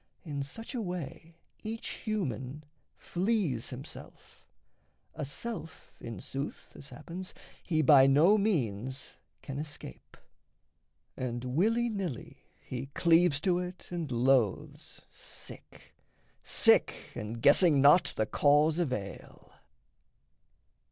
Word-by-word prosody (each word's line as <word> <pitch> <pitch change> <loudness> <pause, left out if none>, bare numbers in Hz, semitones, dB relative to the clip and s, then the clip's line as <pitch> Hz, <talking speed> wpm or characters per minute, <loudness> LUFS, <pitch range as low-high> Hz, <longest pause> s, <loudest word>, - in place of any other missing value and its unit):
In 145 -3 -4
such 225 - -7
a 245 - -2
way 170 -3 -6 0.3
Each 225 +1 -5
human 150 - -4 0.3
flees 180 - -1
himself 130 +2 -10 0.7
a - - -5
self 165 - -7
in 115 -5 -7
sooth, 135 +2 -6
As 140 - -11
happens, 180 +2 -8 0.3
he 155 -3 0
by 135 -2 +7
no 155 +9 +6
means 130 - -1 0.3
can 135 0 -5
escape; 150 - -9 1.0
And 120 -1 -4
willy 215 - +2
nilly 190 - -5 0.2
he 130 +1 -6
cleaves 170 -3 +4
to 180 0 +2
it 180 0 -7
and 170 -5 -4
loathes, 120 -3 0
Sick, - - -11 0.5
sick, - - +3
and 110 +2 -5
guessing 145 +4 +6
not 145 +6 +7
the 110 - +2
cause 150 +7 +3
of 165 -7 0
ail. 100 -6 -7
150 Hz, 110 wpm, -30 LUFS, 130-180 Hz, 1.0 s, by